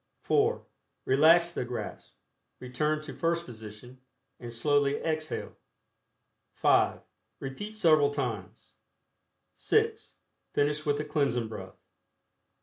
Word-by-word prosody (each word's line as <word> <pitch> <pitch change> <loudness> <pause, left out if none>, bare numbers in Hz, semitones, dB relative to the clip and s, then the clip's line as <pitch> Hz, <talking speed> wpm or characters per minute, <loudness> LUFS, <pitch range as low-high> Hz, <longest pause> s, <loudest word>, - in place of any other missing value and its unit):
(4) 445 +3 +1 0.4
Relax 165 +5 +5
the 170 - -3
grasp, 125 0 -7 0.4
return 150 +5 -1
to 155 - -8
first 170 0 0
position, 115 +2 -11 0.4
and 120 -1 -7
slowly 145 +3 +2
exhale. 155 0 -3 1.0
(5) - - +3 0.4
Repeat 205 +11 -6
several 155 -7 +5
times. 120 -10 -5 0.8
(6) - - 0 0.4
Finish 150 +2 0
with 145 0 +2
the 150 - -3
Cleansing 140 -7 0
Breath. 110 - -9
145 Hz, 100 wpm, -29 LUFS, 125-155 Hz, 1.0 s, Relax